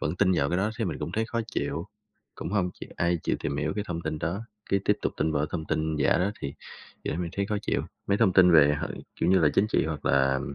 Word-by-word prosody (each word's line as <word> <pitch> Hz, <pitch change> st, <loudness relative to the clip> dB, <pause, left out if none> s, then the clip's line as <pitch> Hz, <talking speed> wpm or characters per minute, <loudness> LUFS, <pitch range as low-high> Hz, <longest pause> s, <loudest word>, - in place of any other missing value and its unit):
vẫn 75 Hz, +5 st, -2 dB
tin 95 Hz, -1 st, +3 dB
vào 70 Hz, -5 st, +2 dB
cái 90 Hz, -, 0 dB
đó 105 Hz, +3 st, +1 dB
thấy -, -, -1 dB
mình -, -, -3 dB
cũng -, -, -4 dB
thấy 110 Hz, -, 0 dB
khó 115 Hz, -1 st, -2 dB
chịu. 85 Hz, +3 st, -2 dB, 0.5 s
Cũng -, -, -5 dB
hông 95 Hz, -4 st, +1 dB
chịu -, -, -7 dB
ai 85 Hz, 0 st, +1 dB
chịu -, -, 0 dB
tìm 70 Hz, -, -2 dB
hiểu 75 Hz, +1 st, -1 dB
cái 105 Hz, -, -1 dB
thông 85 Hz, -1 st, -3 dB
tin 80 Hz, -1 st, -3 dB
đó, 85 Hz, +7 st, -2 dB, 0.3 s
cái 100 Hz, -, +3 dB
tiếp 105 Hz, -, +3 dB
tục -, -, 0 dB
tin 80 Hz, +1 st, 0 dB
vào 70 Hz, -, +1 dB
cái 75 Hz, -, -1 dB
thông 80 Hz, -3 st, -2 dB
tin 80 Hz, 0 st, -1 dB
giả 70 Hz, +3 st, +3 dB
đó 95 Hz, +3 st, +1 dB
thì 70 Hz, -, -4 dB, 0.5 s
điều -, -, -1 dB
đấy 85 Hz, -, -3 dB
mình 85 Hz, -, -4 dB
thấy 100 Hz, 0 st, 0 dB
khó 105 Hz, -, -1 dB
chịu. -, -, 0 dB, 0.2 s
Mấy 100 Hz, -, +2 dB
thông 105 Hz, -5 st, +4 dB
tin 90 Hz, -1 st, +6 dB
về, 75 Hz, -2 st, +7 dB
hả, -, -, -2 dB, 0.3 s
kiểu -, -, +2 dB
như 95 Hz, -, +5 dB
là, 80 Hz, -4 st, +5 dB
chính 100 Hz, -, +4 dB
trị 110 Hz, -, +1 dB
hoặc 80 Hz, -2 st, -4 dB
là 65 Hz, -1 st, +3 dB
85 Hz, 290 wpm, -27 LUFS, 75-100 Hz, 0.5 s, về